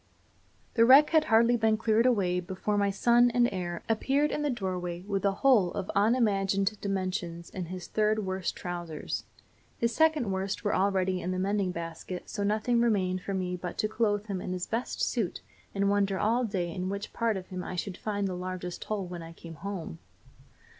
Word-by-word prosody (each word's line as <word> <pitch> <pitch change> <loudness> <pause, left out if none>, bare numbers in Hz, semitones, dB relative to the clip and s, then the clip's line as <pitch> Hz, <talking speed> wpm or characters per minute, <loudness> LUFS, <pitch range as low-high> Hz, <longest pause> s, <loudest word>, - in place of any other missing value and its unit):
The 230 - +5
wreck 270 +5 +7
had 315 -1 +4
hardly 230 +2 +4
been 220 -1 +2
cleared 225 +2 +3
away 185 -7 +2
before 190 +3 -3
my 200 -1 +2
son 240 +5 +4
and 240 0 +3
heir 175 -2 -4
appeared 275 +7 +1
in - - -1
the 295 - 0
doorway 180 -6 -3
with 200 0 -2
a 200 - +4
hole 215 -10 +5
of 190 - -3
unimagined 200 -2 +2
dimensions 185 -3 -3
in 185 -2 -4
his 180 +1 -7
third 215 -1 +1
worst 185 -1 -2
trousers. 175 -3 -5 0.5
His 235 0 0
second 315 -9 +3
worst 190 +3 -2
were 205 - +1
already 190 -1 +1
in 180 - -3
the 185 - -1
mending 195 0 0
basket, 170 +1 -6
so 205 - -3
nothing 215 +4 +1
remained 185 -6 +1
for 195 +1 -3
me 180 -1 -2
but 180 -1 -6
to 215 - +1
clothe 210 -2 0
him 195 -4 -4
in 180 - -4
his 180 -1 -3
best 230 +3 -2
suit 225 -8 -1 0.3
and 200 0 +2
wonder 200 -1 +2
all 235 +5 +2
day 180 -5 -2
in 185 +1 -3
which 200 +1 -5
part 230 -3 0
of 185 - -8
them 185 -1 -5
I 185 - -5
should 185 +1 -3
find 205 -2 -2
the 185 - -3
largest 180 -1 -5
hole 210 -3 -2
when 175 -1 -7
I 165 0 -9
came 165 0 -10
home. 170 - -6
195 Hz, 195 wpm, -29 LUFS, 180-220 Hz, 0.5 s, wreck